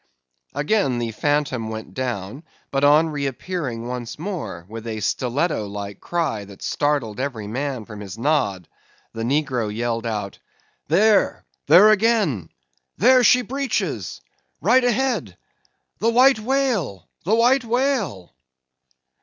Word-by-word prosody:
Again 145 - +1
the 120 -1 -2
phantom 130 -2 -1
went 110 0 -7
down, 125 -1 -4 0.3
but 135 0 0
on 150 +3 +5
re 145 -2 -2
appearing 130 -5 -4
once 125 -2 -5
more, 165 - -5
with 115 +2 -8
a 110 -1 -3
stiletto 125 - -1
like 100 0 -7
cry 155 -12 -2
that 100 -1 -13
startled 140 -7 -1
every 130 -6 -3
man 130 +1 -3
from 105 -2 -10
his 100 0 -8
nod, 115 - 0 0.5
the 115 - -5
negro 125 -3 0
yelled 115 +1 -2
out—"There! 155 - 0 0.2
there 185 +8 +8
again! 205 - +2 0.5
there 255 +4 +5
she 250 +2 +5
breaches! 275 +2 -3 0.4
right 255 0 +4
ahead! 235 - 0 0.6
The 225 - +2
White 255 +1 +5
Whale, 215 - -1 0.2
the 205 +7 +2
White 245 +3 +4
Whale!" 235 - -1
140 Hz, 125 wpm, -22 LUFS, -, 0.6 s, there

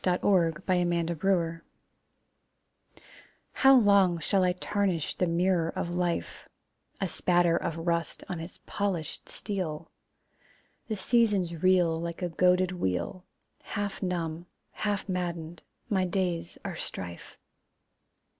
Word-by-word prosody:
The - - +2
Last 180 - -2
Quarter 185 -4 +4
of 190 - -17
the 175 -2 +1
Moon 170 -4 +1 1.9
How 270 0 +6
long 200 -7 +5
shall 185 +4 +1
I 180 0 +3
tarnish 185 -3 -1
the 180 - 0
mirror 170 0 +2
of 170 - -3
life, 175 -1 -2 0.5
A 195 - 0
spatter 175 -1 +2
of 170 -1 -2
rust 170 -1 -1
on 175 - -4
its 165 +2 -8
polished 190 -6 -3
steel! 165 -6 -4 1.0
The 215 - -2
seasons 195 -6 +2
reel 180 -3 +3
Like 170 +1 -5
a 175 - 0
goaded 180 +2 +3
wheel. 135 - -2 0.4
Half 205 -1 -4
numb, 175 -2 -3 0.2
half 205 -2 -2
maddened, 175 -3 -3 0.3
my 190 -3 +1
days 175 -2 -1
are 190 -4 -4
strife. 85 - -6
180 Hz, 125 wpm, -29 LUFS, 170-190 Hz, 1.9 s, How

